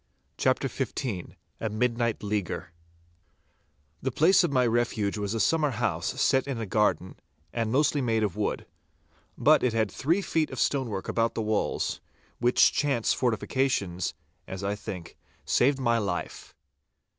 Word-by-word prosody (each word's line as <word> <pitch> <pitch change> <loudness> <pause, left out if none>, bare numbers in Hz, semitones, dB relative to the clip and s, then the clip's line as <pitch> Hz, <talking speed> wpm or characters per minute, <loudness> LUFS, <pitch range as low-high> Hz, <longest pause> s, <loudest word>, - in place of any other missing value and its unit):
*CHAPTER - - +1
XV* 100 -9 -4 0.2
*A 110 - -2
MIDNIGHT 115 +1 0
LEAGUER* 100 -4 -3 1.3
The 130 - -1
place 180 +9 +5
of 175 - 0
my 130 -2 +3
refuge 115 -3 0
was 100 +1 -2
a - - -1
summer 155 +4 +2
house 110 -9 -2
set 135 0 +3
in 135 -4 -3
a 115 - -2
garden, 105 -2 0 0.4
and 115 -2 -1
mostly 145 +2 +2
made 115 -3 +1
of 100 -5 -1
wood. - - -2 0.7
But - - +5
it 125 -3 +1
had 110 -3 +1
three 170 +8 0
feet 160 -4 0
of - - -6
stonework 120 -9 -1
about 115 0 0
the 110 - -1
walls, 110 -1 -1 0.4
which 120 +1 +4
chance 135 -6 +1
fortifications, 115 -6 -1 0.3
as 95 +1 -6
I 100 +1 0
think, 95 -4 -7 0.3
saved 135 +3 +3
my 120 -3 +2
life. 95 -4 -4
115 Hz, 145 wpm, -27 LUFS, 105-130 Hz, 1.3 s, place